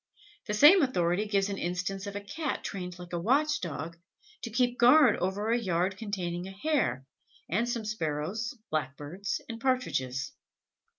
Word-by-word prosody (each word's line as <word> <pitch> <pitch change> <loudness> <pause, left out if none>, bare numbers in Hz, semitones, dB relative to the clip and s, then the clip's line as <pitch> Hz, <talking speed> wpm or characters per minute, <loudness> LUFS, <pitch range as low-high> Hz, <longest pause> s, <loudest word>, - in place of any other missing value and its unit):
The 210 - -1
same 310 - +8
authority 195 - +1
gives 200 -1 +1
an 200 - -3
instance 185 +3 -3
of 200 - -6
a 205 - -3
Cat 295 +9 -4
trained 180 -3 -5
like 175 -1 -10
a 175 - 0
watch 280 - +2
dog, 170 0 -5 0.4
to 235 - -5
keep 245 +2 +1
guard 250 0 +7
over 200 +4 -1
a 240 - +3
yard 185 -2 0
containing 185 -4 -4
a - - -7
Hare, 195 - 0 0.4
and 230 +8 0
some 235 -2 -2
Sparrows, 210 - -3
Blackbirds 155 +6 -3
and 230 -1 -7
Partridges. 140 - -1
200 Hz, 160 wpm, -29 LUFS, 175-235 Hz, 0.4 s, same